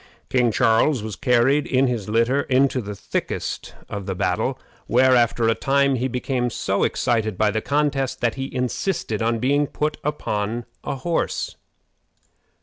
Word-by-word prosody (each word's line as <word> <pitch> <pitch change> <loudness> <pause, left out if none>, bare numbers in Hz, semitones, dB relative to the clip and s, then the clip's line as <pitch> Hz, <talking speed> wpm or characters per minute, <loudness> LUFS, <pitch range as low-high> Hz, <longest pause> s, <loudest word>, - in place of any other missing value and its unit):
King 125 -2 +3
Charles 115 +2 +3
was 110 -2 -5
carried 135 +2 +2
in 130 +1 +3
his 115 -6 -2
litter 115 +5 +2
into 130 -1 +2
the 105 -1 -6
thickest - - -4
of 100 -1 -6
the 95 - -2
battle, 110 +9 0 0.3
where, 130 +2 +4
after 120 -1 +2
a 115 - +4
time, 140 +2 +2
he 130 0 0
became 125 0 -1
so - - -1
excited 110 -4 0
by 105 +1 +3
the 110 +1 -1
contest 140 -2 0
that 120 -2 +1
he 135 0 -5
insisted 125 - -2
on 115 +1 +1
being 140 +4 +2
put 150 +2 -2
upon 115 -6 -2 0.2
a - - -3
horse. 165 +6 -2
125 Hz, 155 wpm, -22 LUFS, 115-135 Hz, 0.3 s, where